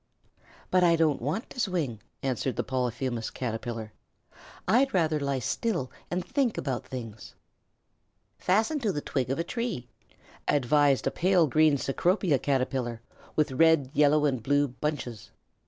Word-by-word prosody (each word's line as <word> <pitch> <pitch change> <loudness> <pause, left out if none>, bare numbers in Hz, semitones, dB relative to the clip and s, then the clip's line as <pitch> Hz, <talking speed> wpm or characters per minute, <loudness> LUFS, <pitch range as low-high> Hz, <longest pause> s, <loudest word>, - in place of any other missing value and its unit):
"But 185 -1 +4
I 170 -1 +5
don't 160 -5 +2
want 150 - -3
to - - -8
swing," 165 - -1 0.2
answered 130 -1 -1
the 120 - -1
Polyphemus 125 -2 -2
Caterpillar. 115 -2 -5 0.7
"I'd 265 0 +3
rather 160 -4 +2
lie 140 -1 -1
still 160 - -2 0.2
and 180 0 -2
think 265 -6 0
about 130 -3 -3
things." 115 -4 -8 1.0
"Fasten 220 +11 +2
to 220 -6 0
the 150 - -3
twig 130 -4 -2
of 135 - 0
a 165 - 0
tree," 200 - -4 0.6
advised 145 0 +3
a - - +1
pale 180 -2 +3
green 155 0 +4
Cecropia 170 +2 +1
Caterpillar 130 -4 -1 0.4
with 155 -2 +2
red, 145 -1 +4
yellow, 150 0 +4
and 130 -5 0
blue 145 +4 +2
bunches. 125 -4 -4
145 Hz, 140 wpm, -28 LUFS, 125-170 Hz, 1.0 s, I